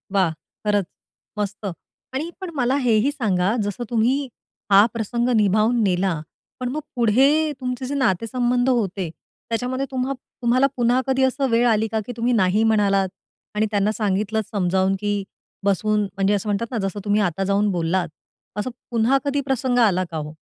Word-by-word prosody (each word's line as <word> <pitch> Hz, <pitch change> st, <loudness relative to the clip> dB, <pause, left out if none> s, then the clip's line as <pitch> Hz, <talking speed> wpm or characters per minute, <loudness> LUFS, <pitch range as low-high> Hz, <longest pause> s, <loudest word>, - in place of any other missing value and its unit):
वाह! 185 Hz, -4 st, +3 dB, 0.3 s
खरंच 205 Hz, -2 st, +2 dB, 0.5 s
मस्त 210 Hz, 0 st, -3 dB, 0.5 s
आणि 295 Hz, +6 st, -2 dB
पण 375 Hz, -, -4 dB
मला 255 Hz, -1 st, +1 dB
हेही 230 Hz, +3 st, +3 dB
सांगा, 205 Hz, -7 st, 0 dB
जसं 205 Hz, +4 st, -3 dB
तुम्ही 235 Hz, +3 st, +2 dB, 0.5 s
हा 200 Hz, +2 st, +8 dB
प्रसंग 235 Hz, +2 st, -1 dB
निभावून 215 Hz, +4 st, +3 dB
नेला 190 Hz, -1 st, +1 dB, 0.5 s
पण 250 Hz, -1 st, -2 dB
मग 300 Hz, +4 st, -3 dB
पुढे 240 Hz, +3 st, +4 dB, 0.3 s
तुमचे 250 Hz, 0 st, -3 dB
जे 270 Hz, -, -4 dB
नातेसंबंध 245 Hz, +1 st, +1 dB
होते, 195 Hz, -7 st, 0 dB, 0.4 s
त्याच्यामध्ये 250 Hz, +3 st, -1 dB
तुम्हा 260 Hz, +1 st, -1 dB
तुम्हाला 255 Hz, +2 st, +1 dB
पुन्हा 245 Hz, +1 st, +3 dB
कधी 265 Hz, 0 st, +2 dB
असं 265 Hz, +1 st, +1 dB
वेळ 235 Hz, +1 st, +3 dB
आली 220 Hz, -1 st, +2 dB
का -, -, +2 dB
की -, -, -5 dB
तुम्ही 240 Hz, +2 st, +1 dB
नाही 190 Hz, +4 st, +2 dB
म्हणालात 200 Hz, -3 st, +2 dB, 0.5 s
आणि 215 Hz, +1 st, +2 dB
त्यांना 205 Hz, 0 st, +2 dB
सांगितलंत 215 Hz, +1 st, 0 dB
समजावून 190 Hz, 0 st, +1 dB
की 205 Hz, 0 st, -1 dB, 0.5 s
बसून 210 Hz, +2 st, +1 dB
म्हणजे 195 Hz, 0 st, 0 dB
असं 205 Hz, +1 st, -1 dB
म्हणतात 205 Hz, +3 st, -1 dB
ना, 240 Hz, -, -2 dB
जसं 195 Hz, +1 st, -5 dB
तुम्ही 205 Hz, +1 st, +2 dB
आता 195 Hz, -1 st, 0 dB
जाऊन 200 Hz, +2 st, +2 dB
बोललात 175 Hz, 0 st, 0 dB, 0.5 s
असं 210 Hz, -, -2 dB, 0.2 s
पुन्हा 235 Hz, +3 st, +3 dB
कधी 285 Hz, 0 st, 0 dB
प्रसंग 260 Hz, -2 st, 0 dB
आला 195 Hz, -6 st, +3 dB
का 160 Hz, -, -3 dB
हो? 150 Hz, 0 st, -5 dB
220 Hz, 165 wpm, -22 LUFS, 195-250 Hz, 0.5 s, हा